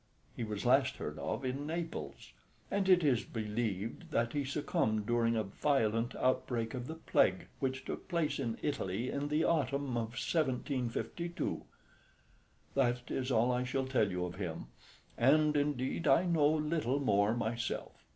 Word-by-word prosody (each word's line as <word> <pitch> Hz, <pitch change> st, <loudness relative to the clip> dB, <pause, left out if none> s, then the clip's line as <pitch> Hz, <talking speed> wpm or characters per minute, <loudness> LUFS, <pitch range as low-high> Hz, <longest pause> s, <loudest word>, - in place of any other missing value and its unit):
He 120 Hz, -, -3 dB
was 105 Hz, +1 st, -4 dB
last 130 Hz, +2 st, +4 dB
heard -, -, -5 dB
of 135 Hz, -, -3 dB
in 135 Hz, +3 st, -2 dB
Naples, 165 Hz, +1 st, -5 dB, 0.4 s
and 195 Hz, -1 st, +1 dB
it 180 Hz, -2 st, +6 dB
is 125 Hz, -5 st, +3 dB
believed 110 Hz, -, -3 dB
that 115 Hz, -6 st, 0 dB
he 145 Hz, -1 st, 0 dB
succumbed 110 Hz, -6 st, 0 dB
during 115 Hz, 0 st, +2 dB
a 110 Hz, -, +1 dB
violent 115 Hz, +1 st, +1 dB
outbreak 120 Hz, -3 st, 0 dB
of 125 Hz, -1 st, -4 dB
the 160 Hz, -, -5 dB
plague 95 Hz, -, +2 dB
which 130 Hz, 0 st, -2 dB
took -, -, -5 dB
place 170 Hz, -6 st, 0 dB
in 115 Hz, -4 st, -2 dB
Italy 125 Hz, -5 st, -1 dB
in 140 Hz, +1 st, -2 dB
the 150 Hz, +2 st, +1 dB
autumn 140 Hz, -3 st, +1 dB
of 115 Hz, 0 st, -3 dB
1752. 140 Hz, +3 st, -1 dB, 1.1 s
That 125 Hz, -2 st, +1 dB
is 130 Hz, 0 st, -1 dB
all 120 Hz, +1 st, +3 dB
I 125 Hz, 0 st, +1 dB
shall 130 Hz, +1 st, -1 dB
tell 130 Hz, -6 st, +2 dB
you 90 Hz, -1 st, -2 dB
of 90 Hz, 0 st, -7 dB
him, 85 Hz, -5 st, -5 dB, 0.5 s
and 150 Hz, +4 st, +4 dB
indeed 145 Hz, +2 st, 0 dB
I 140 Hz, +6 st, +5 dB
know 165 Hz, -4 st, +4 dB
little 150 Hz, -3 st, 0 dB
more 105 Hz, -4 st, +3 dB
myself. 115 Hz, 0 st, -3 dB
130 Hz, 155 wpm, -33 LUFS, 115-145 Hz, 1.1 s, it